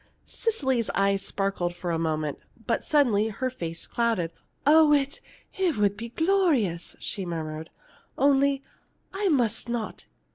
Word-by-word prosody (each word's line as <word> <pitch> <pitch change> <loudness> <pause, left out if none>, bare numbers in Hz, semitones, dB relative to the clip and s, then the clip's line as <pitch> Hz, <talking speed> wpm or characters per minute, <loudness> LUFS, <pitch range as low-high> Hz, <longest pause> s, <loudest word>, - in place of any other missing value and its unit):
Cecily's 265 - 0
eyes 195 0 +2
sparkled 195 -3 -2
for 175 0 -3
a 165 - 0
moment, 155 -2 -1 0.3
but - - 0
suddenly 245 -9 +3
her 255 +4 -2
face 165 -8 -6
clouded. 225 -8 0 0.3
"Oh, 305 +1 +7
it 280 -1 +1 0.3
it 365 - +1
would 205 -1 +2
be 230 +2 -6
glorious!" 300 - +1
she 195 - -4
murmured. 160 -2 -5 0.5
"Only 275 0 +3 0.5
I 395 0 0
must 240 - +1
not. 235 -2 -4
230 Hz, 135 wpm, -26 LUFS, 175-280 Hz, 0.5 s, Oh